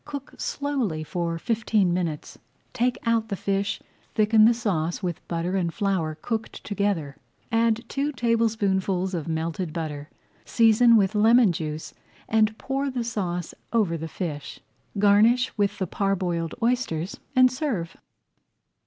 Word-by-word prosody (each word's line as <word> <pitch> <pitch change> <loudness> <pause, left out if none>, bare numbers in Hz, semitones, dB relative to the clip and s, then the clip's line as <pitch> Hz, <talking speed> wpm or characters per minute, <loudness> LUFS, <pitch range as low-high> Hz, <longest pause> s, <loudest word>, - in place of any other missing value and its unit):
Cook 285 -2 -7
slowly 260 - -2
for 170 +1 -2
fifteen 215 -2 +1
minutes, 170 -4 -3 0.3
take 250 0 +1
out 230 -1 +2
the 200 - -1
fish, 200 +2 -1 0.4
thicken 215 0 +5
the 235 - +6
sauce 175 -6 -1
with 175 -3 -3
butter 170 +2 -2
and 175 -3 0
flour 180 -5 -1
cooked 225 -1 -4
together, 200 -9 -1 0.3
add 230 0 +2
two 280 +2 -1
tablespoonfuls 205 -6 0
of 165 -4 -3
melted 165 +1 -2
butter, 150 -2 -5 0.3
season 230 +1 +5
with 195 -1 +2
lemon 220 0 +5
juice, 155 -1 -5 0.3
and 220 0 +2
pour 270 +1 -2
the 250 -2 -2
sauce 180 -7 -3 0.2
over 210 -8 +2
the 160 0 -5
fish. 155 -4 -5 0.4
Garnish 215 +5 +4
with 205 -2 0
the 190 - -1
parboiled 180 -4 -1
oysters 230 -8 -1 0.2
and 255 0 +6
serve. 245 - -3
200 Hz, 135 wpm, -25 LUFS, 170-230 Hz, 0.4 s, the